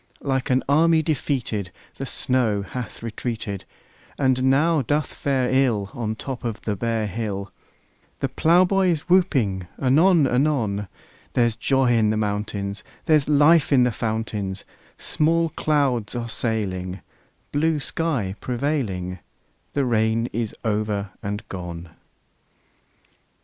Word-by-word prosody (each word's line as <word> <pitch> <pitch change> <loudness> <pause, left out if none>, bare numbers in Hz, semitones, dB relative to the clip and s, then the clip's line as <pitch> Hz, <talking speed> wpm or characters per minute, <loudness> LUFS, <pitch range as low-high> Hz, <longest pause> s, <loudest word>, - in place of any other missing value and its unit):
Like 130 -2 -1
an 130 0 +2
army 160 +3 +4
defeated 125 - -2 0.3
The 135 - -4
snow 115 -6 +1
hath 120 +2 -7
retreated, 110 -3 -4 0.5
And 130 -2 +2
now 150 +4 +3
doth 145 +3 -1
fare 135 -3 0
ill 120 -7 +1
On 115 -3 -3
the 110 - -2
top 130 +2 -6
of 115 -3 -4
the 105 - -1
bare 115 +2 -1
hill; 100 -2 -4 0.7
The - - 0
plowboy 185 +3 +3
is 165 -4 +1
whooping 130 - +2
anon 155 +5 +4
anon: 125 -7 +1 0.5
There's 120 -3 +2
joy 130 +1 +2
in 110 -3 +3
the 110 - +1
mountains; 105 -1 -2 0.2
There's 150 -2 +3
life 150 +1 +5
in 130 -3 +6
the 125 - +2
fountains; 110 -4 -3 0.3
Small 165 +2 +1
clouds 140 -8 0
are 120 -1 -3
sailing, 95 -6 -1 0.5
Blue 155 +1 +1
sky 135 - -1
prevailing; 120 - -2 0.5
The 140 -2 +1
rain 115 -1 +1
is 115 -2 -2
over 105 -2 -1
and 105 +1 -4
gone! 85 -2 -7
120 Hz, 125 wpm, -23 LUFS, 105-145 Hz, 0.7 s, in